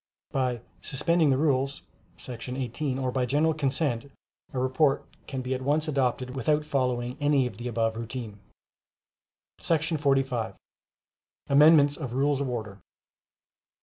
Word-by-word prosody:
By 125 Hz, -3 st, 0 dB, 0.2 s
"suspending 160 Hz, +3 st, +2 dB
the 130 Hz, -, +3 dB
rules" 140 Hz, -2 st, +1 dB, 0.3 s
[§ 125 Hz, +1 st, -6 dB
18], 130 Hz, +2 st, -2 dB
or 130 Hz, -1 st, -1 dB
by 125 Hz, -1 st, 0 dB
general 155 Hz, +5 st, +2 dB
consent, 140 Hz, -3 st, -1 dB, 0.4 s
a -, -, -6 dB
report 130 Hz, +3 st, +2 dB, 0.2 s
can 130 Hz, -2 st, -4 dB
be 130 Hz, +1 st, -2 dB
at 130 Hz, -, -3 dB
once 150 Hz, +4 st, +1 dB
adopted 130 Hz, -3 st, 0 dB
without 150 Hz, +2 st, +1 dB
following 125 Hz, -2 st, -1 dB
any 145 Hz, -2 st, +3 dB
of 115 Hz, -5 st, -5 dB
the 120 Hz, +2 st, -5 dB
above 115 Hz, -1 st, 0 dB
routine. 115 Hz, -2 st, -6 dB, 1.2 s
45. 140 Hz, -7 st, 0 dB, 0.9 s
Amendments 145 Hz, 0 st, +6 dB
of 135 Hz, -6 st, -5 dB
Rules 140 Hz, +1 st, +2 dB
of 140 Hz, -, -1 dB
Order. 110 Hz, -5 st, -5 dB
135 Hz, 130 wpm, -27 LUFS, 125-145 Hz, 1.2 s, Amendments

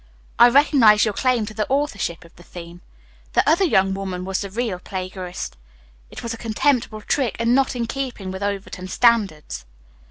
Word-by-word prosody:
"I 240 Hz, -, +9 dB
recognize 240 Hz, -6 st, +5 dB
your 215 Hz, -, -1 dB
claim 250 Hz, -1 st, +1 dB
to 215 Hz, -, -8 dB
the 215 Hz, -1 st, -3 dB
authorship 210 Hz, -, -2 dB
of 165 Hz, -, -19 dB
the -, -, -16 dB
theme. 175 Hz, 0 st, -11 dB, 0.5 s
The -, -, +2 dB
other 330 Hz, +6 st, +4 dB
young 195 Hz, -, +3 dB
woman 190 Hz, -2 st, -4 dB
was 190 Hz, 0 st, -2 dB
the 200 Hz, -, -5 dB
real 215 Hz, -3 st, -3 dB
plagiarist. 185 Hz, -1 st, -6 dB, 0.5 s
It -, -, -10 dB
was 235 Hz, 0 st, -3 dB
a -, -, -7 dB
contemptible 230 Hz, -1 st, 0 dB
trick 250 Hz, -1 st, -1 dB
and 230 Hz, +1 st, +1 dB
not 270 Hz, 0 st, +2 dB
in 235 Hz, -1 st, -1 dB
keeping 240 Hz, -7 st, -5 dB
with 190 Hz, +1 st, -7 dB
Overton 200 Hz, -2 st, -4 dB
standards." 200 Hz, -, +1 dB
210 Hz, 180 wpm, -22 LUFS, 185-245 Hz, 0.5 s, I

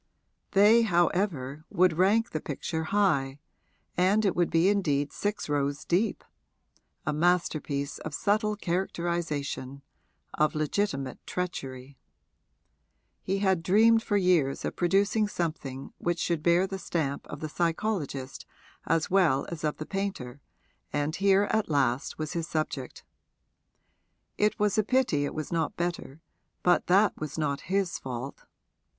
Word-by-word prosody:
They, 210 Hz, +4 st, +6 dB
however, 175 Hz, -, 0 dB
would 180 Hz, -1 st, +3 dB
rank 205 Hz, +6 st, +3 dB
the 155 Hz, -, -3 dB
picture 160 Hz, +2 st, -3 dB
high, 145 Hz, -8 st, +1 dB, 0.6 s
and 195 Hz, +4 st, +3 dB
it 195 Hz, -, +2 dB
would 175 Hz, -1 st, +2 dB
be 165 Hz, +2 st, +3 dB
indeed 150 Hz, -8 st, +1 dB
six 205 Hz, +1 st, -2 dB
rows 145 Hz, 0 st, -1 dB
deep 190 Hz, +6 st, 0 dB, 0.8 s
a 155 Hz, -, 0 dB
masterpiece 155 Hz, -4 st, 0 dB
of 155 Hz, -2 st, -6 dB
subtle 210 Hz, +5 st, +1 dB
characterisation, 170 Hz, -7 st, -3 dB, 0.5 s
of 155 Hz, 0 st, +1 dB
legitimate 150 Hz, -4 st, -1 dB
treachery. 135 Hz, -7 st, -5 dB, 1.2 s
He 195 Hz, -, -1 dB
had 190 Hz, -3 st, +2 dB
dreamed 225 Hz, +6 st, +5 dB
for 205 Hz, -2 st, 0 dB
years 175 Hz, -8 st, +2 dB
of -, -, -3 dB
producing 200 Hz, +4 st, +2 dB
something 155 Hz, -8 st, -4 dB
which 175 Hz, 0 st, -1 dB
should 170 Hz, -2 st, -1 dB
bear 170 Hz, +3 st, +4 dB
the 195 Hz, 0 st, -5 dB
stamp 150 Hz, -6 st, -2 dB
of 145 Hz, -, -7 dB
the 155 Hz, -, -4 dB
psychologist 165 Hz, -5 st, -2 dB, 0.4 s
as 165 Hz, +1 st, +1 dB
well 170 Hz, -8 st, +3 dB
as 165 Hz, -3 st, -7 dB
of 150 Hz, -1 st, -1 dB
the 155 Hz, -, -5 dB
painter, 170 Hz, -10 st, -4 dB, 0.5 s
and 145 Hz, +2 st, -1 dB
here 195 Hz, 0 st, +4 dB
at 220 Hz, -4 st, 0 dB
last 135 Hz, -3 st, 0 dB
was 155 Hz, +1 st, -4 dB
his 170 Hz, -2 st, -2 dB
subject. 155 Hz, -5 st, -3 dB, 1.4 s
It 210 Hz, 0 st, +2 dB
was 210 Hz, 0 st, +2 dB
a -, -, +3 dB
pity 220 Hz, -, +1 dB
it -, -, -5 dB
was 155 Hz, -1 st, -4 dB
not 165 Hz, -2 st, -1 dB
better, 170 Hz, -4 st, -4 dB, 0.4 s
but 180 Hz, 0 st, +3 dB
that 195 Hz, +4 st, +4 dB
was 155 Hz, 0 st, -4 dB
not 145 Hz, -3 st, -1 dB
his 195 Hz, -2 st, 0 dB
fault. 130 Hz, +1 st, -6 dB
170 Hz, 135 wpm, -28 LUFS, 145-195 Hz, 1.4 s, They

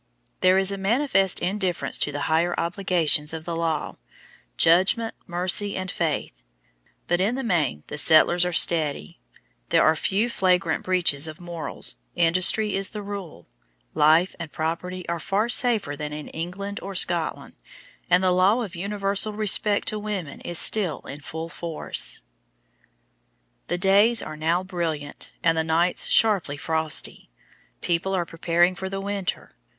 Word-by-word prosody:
There 185 Hz, 0 st, +4 dB
is 195 Hz, 0 st, +4 dB
a 195 Hz, -, -5 dB
manifest 195 Hz, -2 st, +2 dB
indifference 185 Hz, -2 st, -1 dB
to 150 Hz, -, 0 dB
the 145 Hz, 0 st, -5 dB
higher 165 Hz, +3 st, 0 dB
obligations 170 Hz, -4 st, 0 dB
of 160 Hz, -1 st, -7 dB
the 170 Hz, -, -4 dB
law, 165 Hz, -2 st, -3 dB, 0.6 s
"judgment, 190 Hz, +7 st, +3 dB
mercy 180 Hz, +4 st, +3 dB
and 185 Hz, -1 st, -4 dB
faith"; 150 Hz, -, -3 dB, 0.6 s
but 175 Hz, +1 st, 0 dB
in 215 Hz, +6 st, 0 dB
the 270 Hz, -, -4 dB
main 155 Hz, -, -1 dB
the 150 Hz, -, -1 dB
settlers 170 Hz, +3 st, +5 dB
are 180 Hz, -, -1 dB
steady, 155 Hz, -, +2 dB, 0.5 s
there -, -, +3 dB
are 155 Hz, -, +4 dB
few 195 Hz, +8 st, 0 dB
flagrant 180 Hz, -7 st, 0 dB
breaches 170 Hz, -5 st, +2 dB
of 155 Hz, +2 st, -9 dB
morals, 170 Hz, -, -6 dB, 0.2 s
industry 185 Hz, +5 st, +3 dB
is 195 Hz, 0 st, 0 dB
the 210 Hz, -2 st, -7 dB
rule, 200 Hz, -, -8 dB, 0.5 s
life 160 Hz, +5 st, +3 dB
and 160 Hz, -3 st, -7 dB
property 175 Hz, +3 st, -4 dB
are 170 Hz, 0 st, -3 dB
far 205 Hz, +7 st, -1 dB
safer 225 Hz, -, +2 dB
than 150 Hz, +1 st, -6 dB
in 150 Hz, 0 st, -7 dB
England 190 Hz, +5 st, -6 dB
or 195 Hz, 0 st, -7 dB
Scotland, 170 Hz, -3 st, 0 dB, 0.6 s
and 180 Hz, +1 st, +3 dB
the 185 Hz, -, +3 dB
law 195 Hz, +7 st, +2 dB
of 190 Hz, -4 st, -8 dB
universal 200 Hz, +2 st, -1 dB
respect 210 Hz, 0 st, +1 dB
to 215 Hz, -1 st, -4 dB
women 200 Hz, -9 st, -6 dB
is 175 Hz, -, -2 dB
still 185 Hz, -7 st, +1 dB
in 140 Hz, -, -10 dB
full 160 Hz, +2 st, -7 dB
force. 165 Hz, -1 st, +1 dB, 1.4 s
The 175 Hz, -, -2 dB
days 200 Hz, +5 st, +3 dB
are 155 Hz, -, -7 dB
now 165 Hz, +4 st, -1 dB
brilliant 165 Hz, -6 st, -5 dB
and 165 Hz, -1 st, +3 dB
the 160 Hz, -, 0 dB
nights 165 Hz, +2 st, +1 dB
sharply 195 Hz, -10 st, +2 dB
frosty. 160 Hz, -, 0 dB, 0.5 s
People 180 Hz, +3 st, -1 dB
are 175 Hz, -2 st, -1 dB
preparing 170 Hz, +2 st, +1 dB
for 190 Hz, 0 st, -6 dB
the 195 Hz, 0 st, -4 dB
winter. 200 Hz, -1 st, -4 dB
180 Hz, 150 wpm, -24 LUFS, 160-195 Hz, 1.4 s, settlers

